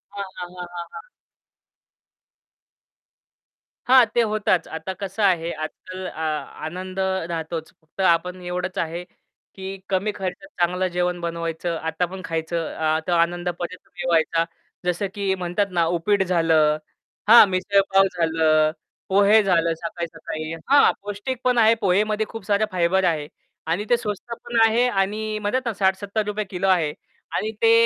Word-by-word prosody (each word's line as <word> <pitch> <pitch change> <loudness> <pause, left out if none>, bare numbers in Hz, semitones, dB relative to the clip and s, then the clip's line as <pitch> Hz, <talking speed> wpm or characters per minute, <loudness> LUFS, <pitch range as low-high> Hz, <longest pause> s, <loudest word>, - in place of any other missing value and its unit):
हां, 200 - -3
हां, 175 0 -6
हां, 180 -1 -6
हां, 170 0 -4
हां. - - -7 2.9
हां, 255 -1 +7
ते 240 - +5
होताच. 210 -5 +1
आता 185 +4 -5
कसं 200 +2 -4
आहे, 170 -3 +2
आजकाल 185 +4 -7
अ, 160 - -8 0.5
आनंद 185 +3 -6 0.3
राहतोच 160 0 -4
फक्त 160 +5 -8
आपण 180 +1 +2
एवढंच 180 +2 -3
आहे, 170 +2 -3 0.5
की 190 -1 -7 0.2
कमी 195 +2 +1
खर्चात 190 +10 -5
चांगलं 180 +2 +2
जेवण 180 0 0
बनवायचं 170 0 -3
आता 160 +3 0
पण 190 0 -7
खायचं 165 0 -2
अ, 160 0 +1
तो - - 0
आनंद 175 +1 +1
परत 175 +1 -5 0.2
मिळवायचा. 165 -2 +1 0.4
जसं 180 +3 0
की 200 -1 0
म्हणतात 180 +3 -1
ना 165 - +4
उपीट 200 +3 +2
झालं, 160 -4 +3 0.5
हां 235 -2 +10
मिसळपाव 195 +1 +3
झालं, 160 -2 +3 0.4
पोहे 205 +3 +6
झालं 170 -3 +2
सकाळी-सकाळी. 165 -1 -5 0.2
हां, 285 0 +6
पौष्टिक 205 +5 -4
पण 250 -1 +2
आहे 225 0 +6
पोहेमध्ये 210 +3 +2
खूप 225 -4 -8
साऱ्या 210 +1 +2
फायबर 185 +1 +2
आहे 155 -4 0 0.4
आणि 205 +5 0
ते 240 - +5
स्वस्त 220 +1 -5
पण 235 -1 0
आहे 235 +3 +3
आणि 215 +1 -1
म्हणत 245 +5 -1
ना 230 - -1
₹60-₹70 200 +2 -1
किलो 190 +1 -1
आहे 165 -6 +2 0.4
आणि 215 +1 -1
ते 225 0 +6
185 Hz, 145 wpm, -23 LUFS, 170-205 Hz, 2.9 s, हां